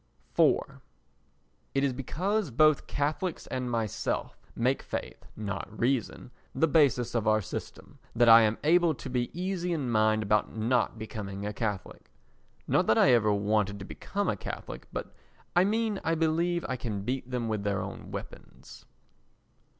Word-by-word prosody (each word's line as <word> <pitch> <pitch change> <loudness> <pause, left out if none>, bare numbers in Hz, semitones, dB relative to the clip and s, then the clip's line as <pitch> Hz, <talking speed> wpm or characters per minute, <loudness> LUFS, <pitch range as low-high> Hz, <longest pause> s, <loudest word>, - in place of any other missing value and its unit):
iv - - +3 0.9
It 135 - +2
is 135 -2 +1
because 180 - -1
both 155 +4 +3
Catholics 155 +5 -2
and 125 -1 -3
myself 115 -4 -2 0.2
make 125 +3 +1
faith, - - -6
not 100 -2 -4
reason, 125 0 -1 0.2
the 160 +5 +3
basis 135 -6 +3
of 115 -2 0
our 110 0 +4
system 100 - -8 0.2
that 120 0 +4
I 115 0 +10
am 110 0 +2
able 170 0 +4
to 130 - -8
be 125 -1 0
easy 180 -1 -2
in 140 -7 -1
mind 110 0 +3
about 105 +2 +1
not 120 +1 +1
becoming 100 -2 -6
a 105 - -3
Catholic. 105 -2 -4 0.6
Not - - +2
that 110 - +4
I 130 - +6
ever 110 -3 +4
wanted 105 0 +1
to 95 - -8
become 200 - -3
a - - +1
Catholic, - - -7
but - - -5 0.4
I 175 +1 +5
mean 215 -1 0
I 165 - +1
believe 165 +2 +1
I 130 - -2
can 105 -5 -4
beat 125 +2 -3
them 125 -2 -2
with 110 -2 -1
their 100 -1 -1
own - - -7
weapons. - - -10
125 Hz, 160 wpm, -29 LUFS, 110-155 Hz, 0.9 s, I